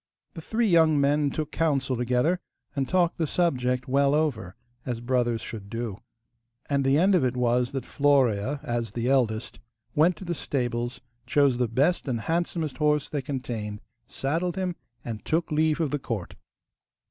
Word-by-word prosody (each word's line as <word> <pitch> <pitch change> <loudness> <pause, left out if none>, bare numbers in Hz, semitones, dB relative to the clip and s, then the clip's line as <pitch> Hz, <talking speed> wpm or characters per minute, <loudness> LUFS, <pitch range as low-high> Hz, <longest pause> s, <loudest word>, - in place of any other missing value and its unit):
The 165 - -8
three 225 +8 0
young 160 -5 +5
men 145 +1 +3
took 155 +2 -4
counsel 140 -5 +1
together, 125 +9 +1 0.4
and 135 -2 -1
talked 180 -2 +2
the 160 - +1
subject 125 -7 0
well 140 +2 +3
over, 140 - -1 0.3
as 120 -2 -3
brothers 120 -2 0
should 105 -4 -8
do. 115 -2 -4 0.7
And 140 -1 +1
the 135 +1 +3
end 190 +5 +4
of 175 -7 +4
it 125 0 0
was 125 +1 +2
that 135 - -3
Florea, 140 -2 +2
as 120 -6 -2
the 120 0 -2
eldest, 120 -5 +1 0.3
went 165 +4 +4
to 190 - -10
the 170 - -1
stables, 120 -5 -2 0.3
chose 135 -2 +3
the 125 - +2
best 140 +10 +1
and 120 -4 -1
handsomest 165 -1 -1
horse 150 -1 +1
they 145 - -2
contained, 120 -6 -4 0.3
saddled 165 +6 -2
him, 185 -2 -2 0.3
and 110 -3 -5
took 165 +1 0
leave 155 +1 +2
of 160 -4 0
the 145 - -1
court. 110 -8 -4
135 Hz, 170 wpm, -26 LUFS, 120-155 Hz, 0.7 s, young